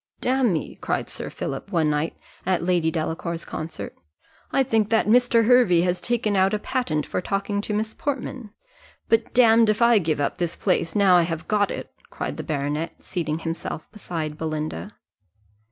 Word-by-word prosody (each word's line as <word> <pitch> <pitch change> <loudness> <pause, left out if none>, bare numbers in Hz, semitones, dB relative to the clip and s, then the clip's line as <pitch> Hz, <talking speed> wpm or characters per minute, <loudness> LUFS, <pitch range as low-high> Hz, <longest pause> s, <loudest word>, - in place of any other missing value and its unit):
"Damme," 250 -10 0
cried - - -2
Sir - - -5
Philip, 135 +9 -5
one 160 -5 +2
night, 150 +2 -1 0.3
at 185 -2 0
Lady 175 -2 +2
Delacour's 165 +1 -3
concert, 155 -11 -6 0.6
"I 270 - +3
think 225 -5 +1
that 225 -1 +3
Mr. 235 0 +4
Hervey 235 -8 +5
has 180 0 0
taken 230 -4 0
out 190 +2 +3
a - - +1
patent 205 - -1
for - - -2
talking 200 +2 -1
to 210 - -5
Miss 220 +1 -1
Portman; 265 -4 -4 0.6
but 225 0 +2
damme 230 -2 +6
if 215 - +2
I 235 -2 +6
give 160 -4 -1
up 145 +5 -1
this 175 -2 -1
place, 180 -4 0
now 195 -3 +6
I - - +5
have 165 -1 -3
got 205 -1 +2
it," - - -6 0.2
cried - - -5
the - - -4
baronet, 150 +1 -2
seating 160 -4 -3
himself 165 -1 -5
beside 160 -7 -5
Belinda. 155 - -4
180 Hz, 170 wpm, -24 LUFS, 160-220 Hz, 0.6 s, damme